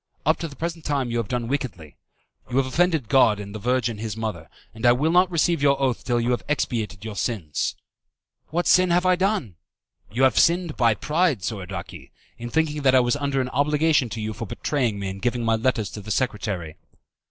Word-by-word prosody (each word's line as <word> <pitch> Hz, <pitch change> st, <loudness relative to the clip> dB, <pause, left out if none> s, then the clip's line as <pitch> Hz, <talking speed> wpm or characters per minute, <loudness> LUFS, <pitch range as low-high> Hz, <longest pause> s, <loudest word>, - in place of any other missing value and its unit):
Up 155 Hz, +2 st, +3 dB
to 165 Hz, -, -3 dB
the 145 Hz, -, -12 dB
present 165 Hz, 0 st, -4 dB
time 135 Hz, -4 st, -1 dB
you 120 Hz, -, -1 dB
have 115 Hz, -3 st, -1 dB
done 120 Hz, -2 st, -2 dB
wickedly. 115 Hz, -, -4 dB, 0.5 s
You 125 Hz, -, -1 dB
have 135 Hz, -, +3 dB
offended 160 Hz, -2 st, +1 dB
God 115 Hz, -6 st, +4 dB
and 100 Hz, 0 st, -7 dB
the 110 Hz, -, -6 dB
Virgin 120 Hz, -1 st, 0 dB
His 110 Hz, -1 st, -4 dB
Mother, 105 Hz, -8 st, -4 dB, 0.2 s
and 110 Hz, -, -11 dB
I 120 Hz, 0 st, +6 dB
will 150 Hz, +6 st, +1 dB
not 180 Hz, +1 st, +4 dB
receive 170 Hz, -2 st, +1 dB
your 140 Hz, -1 st, +3 dB
oath 130 Hz, -3 st, 0 dB
till 120 Hz, -1 st, 0 dB
you 120 Hz, +1 st, 0 dB
have 125 Hz, -, 0 dB
expiated 110 Hz, -8 st, -2 dB
your 110 Hz, -2 st, -6 dB
sins." 95 Hz, -, -2 dB, 0.7 s
"What 175 Hz, +2 st, -1 dB
sin 185 Hz, 0 st, +5 dB
have 175 Hz, +1 st, +2 dB
I 185 Hz, 0 st, +5 dB
done?" 185 Hz, -, -1 dB, 0.5 s
"You 125 Hz, +5 st, 0 dB
have 130 Hz, -3 st, +4 dB
sinned 170 Hz, -2 st, +2 dB
by 115 Hz, -3 st, +3 dB
pride, 150 Hz, -, 0 dB
Soradaci, 100 Hz, -2 st, -6 dB, 0.3 s
in 120 Hz, 0 st, -5 dB
thinking 150 Hz, +2 st, 0 dB
that 130 Hz, -2 st, +4 dB
I -, -, +7 dB
was 120 Hz, +1 st, +2 dB
under 140 Hz, -2 st, -1 dB
an 130 Hz, -, -3 dB
obligation 145 Hz, 0 st, +2 dB
to 110 Hz, +1 st, -5 dB
you 110 Hz, 0 st, -3 dB
for 115 Hz, -, -6 dB
betraying 120 Hz, -2 st, -1 dB
me 100 Hz, -1 st, -4 dB
and 95 Hz, +1 st, -6 dB
giving 120 Hz, -1 st, -1 dB
my 115 Hz, 0 st, +3 dB
letters 110 Hz, -3 st, 0 dB
to 105 Hz, -, -7 dB
the 105 Hz, -, -11 dB
secretary." 100 Hz, -8 st, -2 dB
125 Hz, 215 wpm, -24 LUFS, 110-150 Hz, 0.7 s, I